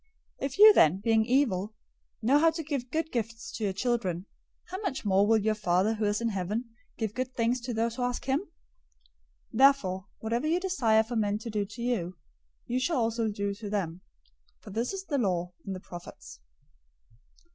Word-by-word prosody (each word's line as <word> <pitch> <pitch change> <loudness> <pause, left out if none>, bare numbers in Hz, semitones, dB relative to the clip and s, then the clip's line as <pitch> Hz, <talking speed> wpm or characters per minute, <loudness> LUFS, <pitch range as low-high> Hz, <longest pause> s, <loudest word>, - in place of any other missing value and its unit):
007:011 - - 0
If 265 - -9
you 425 +1 +10
then, 160 - +5
being 220 +1 +2
evil, 215 -6 +1 0.5
know 270 +6 +5
how 325 +2 +5
to 325 0 -4
give 280 -5 -3
good 320 +3 -2
gifts 230 +7 -4
to 225 - -5
your 200 - +1
children, 195 -5 -1 0.4
how 375 +3 -5
much 330 - -3
more 200 0 +4
will 225 0 +5
your 215 +1 +1
Father 195 0 +1
who 215 -1 -1
is 205 0 +1
in 235 0 0
heaven 210 +4 -3 0.3
give 220 -3 -2
good 255 +1 -4
things 235 +1 +1
to 245 +1 -4
those 230 +1 -1
who - - -3
ask 245 0 -2
him! 270 +2 +2
007:012 400 - -11 1.1
Therefore 220 -8 +4
whatever 235 +6 -1
you 335 +3 +2
desire 245 - +2
for 235 +2 -6
men 205 -2 +1
to 225 +1 -7
do 210 -1 -1
to 225 +4 -8
you, 185 -8 -1 0.5
you 250 +2 -1
shall 285 +4 0
also 230 -1 0
do 200 -1 -2
to 205 +1 -7
them; 185 -4 -2 0.6
for 210 - -12
this 230 +4 -1
is 390 -1 -5
the 285 -6 -1
law 180 -5 -1
and 195 - -3
the - - -6
prophets. 175 - -11
225 Hz, 200 wpm, -29 LUFS, 200-255 Hz, 1.1 s, you